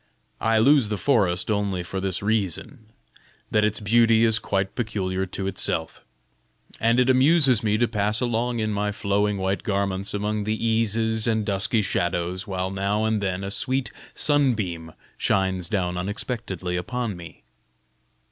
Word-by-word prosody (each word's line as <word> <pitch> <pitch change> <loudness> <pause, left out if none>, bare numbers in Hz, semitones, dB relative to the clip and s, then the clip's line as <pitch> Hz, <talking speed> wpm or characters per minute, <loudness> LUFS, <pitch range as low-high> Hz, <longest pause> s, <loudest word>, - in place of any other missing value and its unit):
I 115 0 +2
love 130 0 +4
the 105 - -1
forest 95 -4 +1
only 100 -3 -1
for 95 +2 -4
this 95 0 -1
reason, 110 - -2 0.6
that 105 - +3
its 105 0 +1
beauty 115 +1 +4
is 110 -1 +3
quite 95 -1 -2
peculiar 95 -5 -2
to 95 +1 -5
itself, 90 -4 -2 0.8
and 115 +2 +3
it 125 - +3
amuses 130 -2 +4
me 105 -1 +1
to 120 +2 +2
pass 105 +1 0
along 120 0 -1
in 110 0 -1
my 105 0 -1
flowing 100 0 0
white 95 +1 -1
garments 100 -1 -2
among 105 +1 -1
the 110 +1 -1
eases 110 0 +1
and 110 -2 +1
dusky 100 +2 +1
shadows, 90 +2 -2
while 95 -1 -2
now 100 +3 0
and 110 -1 0
then 95 -1 -2
a 100 - -4
sweet 130 +5 -1 0.2
sunbeam 105 - +1 0.3
shines 95 -2 0
down 90 -4 -1
unexpectedly 100 -3 -3
upon 115 +3 -3
me." 85 -2 -12
105 Hz, 150 wpm, -24 LUFS, 95-115 Hz, 0.8 s, love